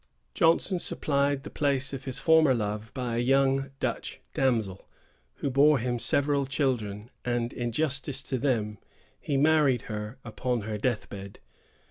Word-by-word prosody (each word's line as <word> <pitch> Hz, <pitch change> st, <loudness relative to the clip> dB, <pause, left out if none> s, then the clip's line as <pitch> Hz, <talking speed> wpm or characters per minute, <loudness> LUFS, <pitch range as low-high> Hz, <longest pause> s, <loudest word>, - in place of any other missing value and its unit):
Johnson 175 Hz, +1 st, +3 dB
supplied 140 Hz, -3 st, 0 dB
the -, -, -8 dB
place 140 Hz, -2 st, 0 dB
of 135 Hz, 0 st, -6 dB
his 130 Hz, -2 st, -4 dB
former 160 Hz, -5 st, +5 dB
love 105 Hz, 0 st, -3 dB
by 125 Hz, -2 st, -2 dB
a -, -, 0 dB
young 135 Hz, +2 st, +2 dB
Dutch -, -, -3 dB
damsel, 110 Hz, -8 st, 0 dB, 0.5 s
who 140 Hz, -, -2 dB
bore 145 Hz, +3 st, +5 dB
him 120 Hz, 0 st, -2 dB
several 140 Hz, +2 st, +2 dB
children; 120 Hz, -6 st, -1 dB
and, 120 Hz, -1 st, -1 dB
in 120 Hz, -1 st, -3 dB
justice 140 Hz, 0 st, 0 dB
to 130 Hz, -, -3 dB
them, 110 Hz, -6 st, 0 dB, 0.4 s
he 140 Hz, -, -1 dB
married 145 Hz, -4 st, +3 dB
her 105 Hz, +2 st, -6 dB
upon 120 Hz, +1 st, -2 dB
her 105 Hz, 0 st, -4 dB
death 120 Hz, 0 st, -1 dB
bed. 100 Hz, -1 st, -9 dB
130 Hz, 150 wpm, -28 LUFS, 115-140 Hz, 0.5 s, former